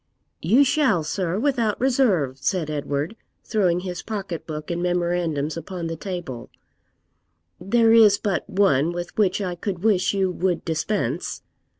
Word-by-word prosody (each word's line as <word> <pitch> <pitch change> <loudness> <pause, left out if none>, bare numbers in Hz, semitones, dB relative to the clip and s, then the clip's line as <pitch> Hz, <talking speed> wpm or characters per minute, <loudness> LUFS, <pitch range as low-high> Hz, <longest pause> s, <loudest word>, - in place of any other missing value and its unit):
'You 230 - +5
shall, 265 - +2
sir, 175 +3 -2
without 235 -4 0
reserve,' 210 - +2
said 155 +3 -1
Edward, 145 +5 -2 0.3
throwing 180 -5 +1
his 180 -1 -5
pocket 195 -6 -5
book 155 0 -5
and 170 0 -2
memorandums 175 -4 -1
upon 170 +1 -6
the 165 0 -3
table; 170 - -6 1.1
'there 225 +5 +3
is 215 -3 +7
but 200 -2 -2
one 175 -6 +2
with 175 0 -6
which 205 -2 +1
I 185 -2 -2
could 180 0 -5
wish 200 -3 +2
you 190 -2 +1
would 180 0 -1
dispense.' 165 +5 -2
180 Hz, 140 wpm, -23 LUFS, 165-210 Hz, 1.1 s, is